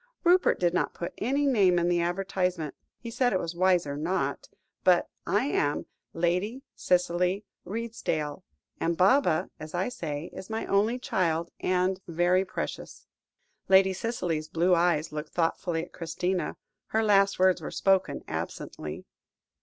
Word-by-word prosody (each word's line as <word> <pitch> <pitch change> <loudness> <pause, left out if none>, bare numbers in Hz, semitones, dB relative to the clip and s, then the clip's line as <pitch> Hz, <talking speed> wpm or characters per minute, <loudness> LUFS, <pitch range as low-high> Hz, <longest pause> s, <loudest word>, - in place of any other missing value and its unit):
"Rupert 360 +1 +4
did 175 -1 +2
not 180 - 0
put 170 - -5
any 275 +6 +1
name 200 -10 +4
in 175 0 +2
the 175 -1 +2
advertisement; 180 -3 -1 0.2
he 235 - -8
said 245 +1 +1
it 185 - +2
was 170 0 -4
wiser 175 -5 +2
not 170 +6 -2 0.3
but - - +4 0.2
I - - +2
am 145 - 0 0.3
Lady 180 +10 -1
Cicely 180 +2 +1 0.2
Redesdale, 190 -9 -3 0.4
and 165 0 0
Baba, 185 - +3
as 155 +2 -7
I 185 +6 0
say, 160 -8 -5
is 190 +2 -9
my 220 0 -3
only 210 +5 +2
child, 170 -8 -1
and 185 +1 +1
very 175 +2 +2
precious." 195 - -6 0.6
Lady 190 0 +6
Cicely's 180 -7 -2
blue 175 +3 +2
eyes 170 -3 +2
looked 150 0 -6
thoughtfully 165 0 0
at - - -12
Christina, 175 +2 -2 0.3
her 220 0 +1
last 200 -2 +4
words 185 0 +3
were - - -5
spoken 190 -1 +1
absently. - - -5
180 Hz, 145 wpm, -28 LUFS, 170-195 Hz, 0.6 s, Lady